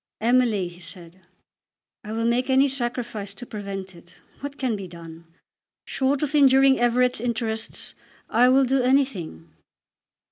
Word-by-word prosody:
"Emily," 230 -5 +2
he 175 0 -13
said, 175 0 -7 0.8
"I 210 - -8
will 225 +1 -2
make 240 +3 +1
any 265 +1 +4
sacrifice 240 -6 -4
to 245 - -8
prevent 195 -4 -7
it. 170 +1 -16 0.2
What 285 +1 -7
can 255 -5 -1
be 195 -2 -7
done? 165 -1 -12 0.6
Short 270 +2 0
of 300 0 -2
injuring 270 -2 +5
Everett's 245 0 +2
interests 230 -2 -3 0.3
I 245 +3 +4
will 265 +1 +4
do 265 +1 +1
anything." 225 - -1
235 Hz, 140 wpm, -24 LUFS, 195-260 Hz, 0.8 s, injuring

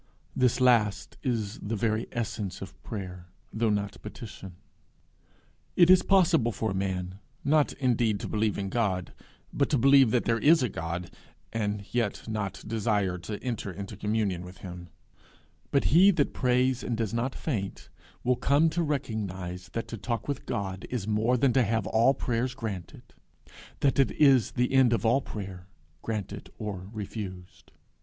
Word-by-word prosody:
This 125 -1 +2
last 115 -5 +2
is 115 -5 -2
the 110 +2 -3
very 110 +1 0
essence 105 -5 -3
of 95 -1 -10
prayer, 90 -5 -7 0.3
though 115 0 +1
not 100 -1 -2
petition. 105 -4 -9 1.2
It 175 0 +7
is 185 - +7
possible 170 - +3
for 110 -1 -2
a - - -2
man, 95 -1 -3 0.3
not 150 0 +3
indeed 120 -5 +1
to - - -4
believe 105 -1 0
in 100 -1 -3
God, 95 -6 -1 0.4
but 140 - +1
to 145 - +2
believe 135 0 +6
that 120 +1 +1
there 115 0 +2
is 155 +1 +5
a 125 - +1
God, 85 0 -4 0.4
and 105 -2 -2
yet 115 -4 -1
not 105 -3 -3
desire 105 -4 0
to 100 +4 -5
enter 115 -5 -3
into 100 +3 -7
communion 105 -3 -1
with 90 +1 -11
him; 90 -1 -8 0.8
but 140 - +2
he 185 +5 +8
that 160 -7 +2
prays 125 0 +2
and 120 - -2
does 115 -3 -2
not 120 +3 -1
faint 105 -11 -4 0.3
will 125 +1 +3
come 150 +6 +3
to 175 - 0
recognize 95 - -3
that 115 - -3
to 115 - -5
talk 115 +2 -3
with 140 -2 -4
God 95 -4 -3
is 115 -5 -3
more 110 +4 +2
than 125 0 +3
to 135 - +4
have 110 -1 0
all 115 +5 +3
prayers 125 +1 -1
granted 100 - -6 0.8
that 140 -1 +2
it 135 - +5
is 135 -6 +4
the 125 +1 0
end 130 -3 +5
of 115 - 0
all 120 +5 +4
prayer, 95 -6 -7 0.3
granted 110 -4 -5
or 100 -3 -5
refused. 100 -4 -7
110 Hz, 165 wpm, -28 LUFS, 100-125 Hz, 1.2 s, he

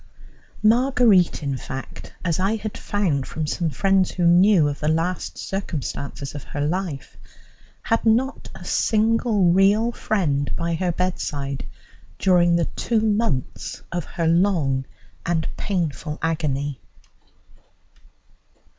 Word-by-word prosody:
Marguerite, 225 - +4
in 140 -2 -1
fact, 135 +1 -8
as 170 -1 0
I 195 +4 +1
had 215 -1 -5
found 170 -10 -1
from 155 - -3
some 165 +2 -1
friends 190 +5 +2
who 175 - -1
knew 175 -1 +5
of 145 0 -3
the 150 - -2
last 165 +3 -1
circumstances 145 -7 -4
of 145 -3 -7
her 145 - -5
life, 160 -2 -3 0.7
had 225 - +1
not 240 +5 +1
a 185 - -11
single 220 -3 +2
real 200 +5 +4
friend 155 -12 -1
by 170 0 -1
her 180 +2 0
bedside 145 -6 -3 0.5
during 175 -2 +4
the 170 -1 +2
two 230 -2 -1
months 210 - -1
of 175 -2 -2
her 170 - -3
long 165 -7 +2 0.4
and 165 -2 0
painful 165 -5 -2
agony. 145 -4 -1
175 Hz, 120 wpm, -23 LUFS, 150-205 Hz, 0.7 s, knew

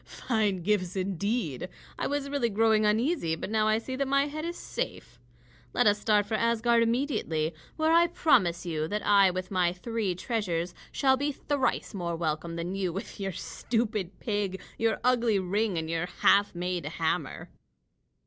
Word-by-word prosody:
Fine 210 -7 -1
gifts, 185 -2 0
indeed! 190 - -2 0.3
I - - 0
was 285 0 -2
really 280 -4 0
growing 215 0 +3
uneasy, 220 - +1
but 175 - -6
now 215 -1 +2
I 215 0 +3
see 260 +3 -5
that 275 0 0
my 275 +1 +3
head 305 +1 -5
is 345 +1 -4
safe. 125 - -5 0.5
Let - - +3
us 205 0 +4
start 210 -1 +3
for 215 - -6
Asgard 230 +1 +2
immediately, 225 - 0 0.2
where 315 0 +2
I 340 +1 +6
promise 185 - +2
you 155 -2 -2
that 210 +3 -3
I 200 -2 +6
with 185 +1 -4
my 180 -2 +2
three 205 0 -2
treasures 180 -5 -2 0.2
shall 265 -1 +3
be 285 +2 0
thrice 280 -3 -1
more 175 -4 -3
welcome 165 0 -2
than 170 +2 -3
you 190 -2 -1
with 195 +5 -7
your 195 -1 -3
stupid 215 -2 -2
pig, 205 -3 -2 0.2
your 225 -1 0
ugly 240 -4 +3
ring, 195 +1 0
and 160 0 -2
your 165 +1 -1
half 200 +1 +3
made 180 0 -2
hammer." 160 -1 -2
205 Hz, 170 wpm, -28 LUFS, 180-235 Hz, 0.5 s, I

